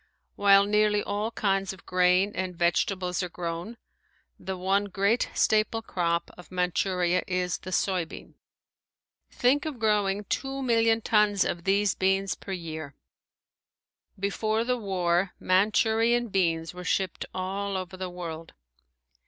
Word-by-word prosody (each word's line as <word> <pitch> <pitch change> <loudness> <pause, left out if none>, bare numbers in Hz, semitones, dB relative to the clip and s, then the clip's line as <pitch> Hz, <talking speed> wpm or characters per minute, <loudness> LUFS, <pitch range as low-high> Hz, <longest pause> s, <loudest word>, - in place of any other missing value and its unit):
While 200 0 +6
nearly 210 0 +2
all 205 +2 -2
kinds 195 -3 0
of 185 - -16
grain 180 +2 +3
and 185 -1 -3
vegetables 180 +2 0
are 180 - -3
grown, 170 +6 -5 0.6
the 190 -1 -5
one 195 +2 +1
great 200 +4 +1
staple 220 +1 +2
crop 170 -4 -1
of 180 - -13
Manchuria 180 0 +1
is 180 -1 -1
the 185 - -8
soybean. 180 -2 -2 1.0
Think 265 +4 +2
of 295 -5 -5
growing 210 -3 +1
two 270 +6 -3
million 230 -2 +3
tons 210 -3 +3
of 170 -1 -3
these 200 0 +2
beans 195 +1 +1
per 195 - -9
year! 160 -5 -6 1.2
Before 215 +3 0
the 250 +1 0
war 180 -3 0
Manchurian 220 +5 +2
beans 165 -4 0
were 180 0 -8
shipped 185 -1 -1
all 195 +1 -3
over 185 0 -6
the 185 0 -5
world. 165 -2 -7
195 Hz, 130 wpm, -27 LUFS, 180-210 Hz, 1.2 s, While